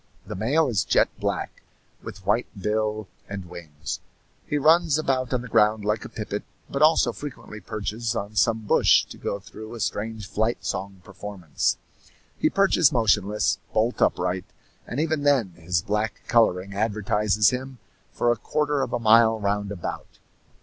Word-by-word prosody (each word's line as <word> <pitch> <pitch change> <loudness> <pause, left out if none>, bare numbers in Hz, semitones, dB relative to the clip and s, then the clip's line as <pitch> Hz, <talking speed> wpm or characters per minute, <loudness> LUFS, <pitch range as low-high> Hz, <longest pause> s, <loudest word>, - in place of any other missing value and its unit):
The 105 - -6
male 135 - +2
is 105 -10 +1
jet - - +3
black, - - -3 0.4
with 95 - -10
white 105 +5 +1
bill 105 +1 -1 0.2
and 100 -2 -6
wings. 75 -6 -7 0.5
He 150 - 0
runs 160 +1 +4
about 130 -5 0
on 125 -2 0
the - - -7
ground 105 -1 +3
like 105 0 0
a - - -8
pipit, - - -4 0.3
but 140 - -3
also 155 +2 +5
frequently 135 -7 -8
perches 110 +3 -3
on 105 0 -4
some 110 +2 +2
bush - - +4
to - - -12
go 100 - -3
through 110 +3 -10
a - - -8
strange 110 0 -3
flight 110 +4 -1
song 95 -1 -4
performance. 100 -4 -3 0.6
He - - +1
perches 195 -6 +4
motionless, 105 -4 +2
bolt 115 +3 +1
upright, 90 +1 +1 0.4
and 125 - -4
even 160 -1 0
then 140 -8 +3
his 85 0 -2
black 105 +1 -2
coloring 100 -4 +2
advertises 105 0 +2
him 130 +1 -5 0.3
for 120 - +1
a 120 - 0
quarter 150 +3 0
of - - -3
a 120 - 0
mile 115 0 +5
round 100 0 -1
about. 95 -4 -6
110 Hz, 160 wpm, -25 LUFS, 100-125 Hz, 0.6 s, also